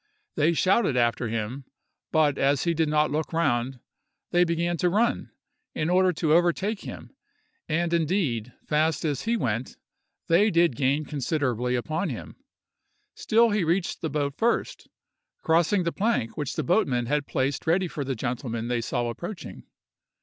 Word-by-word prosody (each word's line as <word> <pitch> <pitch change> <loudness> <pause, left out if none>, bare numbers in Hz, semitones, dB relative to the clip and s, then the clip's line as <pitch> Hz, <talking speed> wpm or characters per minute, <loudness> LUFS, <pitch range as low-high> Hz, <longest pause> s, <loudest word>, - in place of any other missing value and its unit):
They 155 +3 +2
shouted 185 - +2
after 120 0 +1
him, 115 +4 -4 0.5
but 150 -3 +2
as 140 0 +2
he 170 - +1
did 160 -1 +1
not 150 0 +2
look 155 +2 -2
round, 130 -6 0 0.5
they 175 0 +4
began 170 0 0
to 180 - +2
run, 225 +6 +1 0.5
in 155 +3 0
order 185 0 +4
to 155 -2 +1
overtake 175 +5 +2
him; - - -9 0.6
and, 170 +2 0
indeed, 150 - 0
fast 155 0 +1
as 145 -4 -2
he 230 +1 +1
went, 115 - -2 0.5
they 190 +6 +4
did 170 - +3
gain 140 +4 +1
considerably 130 -4 -1
upon 155 +9 -2
him. 125 - -7 0.8
Still 230 +1 +3
he 205 -2 +1
reached 170 +2 -1
the 160 - -2
boat 145 -2 -1
first, 235 +5 -1 0.6
crossing 170 +4 +3
the 170 - -1
plank 205 - -1
which 145 -4 -3
the - - -1
boatmen 135 - +1
had 145 +3 -1
placed 135 +4 -1
ready 180 +3 +2
for 150 -3 -4
the 135 -1 -3
gentlemen 120 -1 -3
they 120 -1 0
saw 120 +1 -2
approaching. 175 - -7
155 Hz, 155 wpm, -26 LUFS, 130-175 Hz, 0.8 s, they